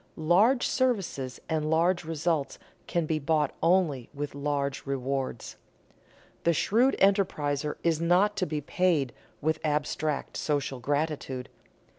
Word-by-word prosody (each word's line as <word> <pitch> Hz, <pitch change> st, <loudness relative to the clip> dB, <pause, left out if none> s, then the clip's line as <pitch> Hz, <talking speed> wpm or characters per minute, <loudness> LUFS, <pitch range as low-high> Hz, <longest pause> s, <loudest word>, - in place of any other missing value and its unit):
Large 195 Hz, +11 st, +4 dB
services 195 Hz, -, -1 dB
and 155 Hz, -1 st, -1 dB
large 170 Hz, +3 st, +2 dB
results 160 Hz, -2 st, -1 dB, 0.3 s
can 170 Hz, -2 st, 0 dB
be 155 Hz, 0 st, 0 dB
bought 150 Hz, 0 st, +1 dB
only 165 Hz, -8 st, +2 dB
with 145 Hz, 0 st, -4 dB
large 140 Hz, -1 st, -2 dB
rewards. 135 Hz, -2 st, -3 dB, 0.9 s
The 170 Hz, -, +3 dB
shrewd 235 Hz, -, +3 dB
enterpriser 150 Hz, -7 st, +1 dB
is 165 Hz, -1 st, +1 dB
not 180 Hz, +5 st, +3 dB
to 185 Hz, -, 0 dB
be 150 Hz, -1 st, -2 dB
paid 160 Hz, -5 st, +1 dB, 0.3 s
with 160 Hz, +1 st, 0 dB
abstract 150 Hz, 0 st, -1 dB
social 140 Hz, -3 st, -1 dB
gratitude. 145 Hz, -1 st, -2 dB
155 Hz, 120 wpm, -28 LUFS, 140-175 Hz, 0.9 s, Large